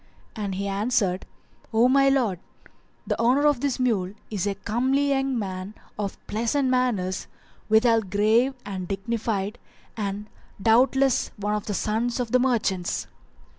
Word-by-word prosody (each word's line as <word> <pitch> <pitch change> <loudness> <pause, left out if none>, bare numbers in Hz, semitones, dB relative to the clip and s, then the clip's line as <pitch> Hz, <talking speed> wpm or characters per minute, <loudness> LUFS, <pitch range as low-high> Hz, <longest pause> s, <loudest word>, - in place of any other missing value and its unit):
and 200 -4 -3
he 200 +1 -2
answered, 200 -2 0 0.4
"O 230 +2 +4
my 275 +1 +5
lord, 240 -10 +1 0.7
the - - 0
owner 255 +5 +3
of 290 -4 +4
this 275 -1 -1
mule 210 -6 0 0.2
is 205 -2 -1
a 200 - -1
comely 260 +8 0
young 270 -2 +1
man 190 -1 -4 0.2
of 200 -2 -3
pleasant 235 +5 0
manners, 235 -8 0 0.4
withal 225 +1 +5
grave 220 +7 +2
and 190 -3 -5
dignified, 205 +1 -2 0.4
and 205 -1 -3 0.3
doubtless 255 +5 +3
one 205 +1 -1
of 210 -1 -3
the 205 - -2
sons 230 +5 -1
of 240 -3 -2
the 255 - +4
merchants." 215 -8 0
220 Hz, 140 wpm, -25 LUFS, 200-255 Hz, 0.7 s, my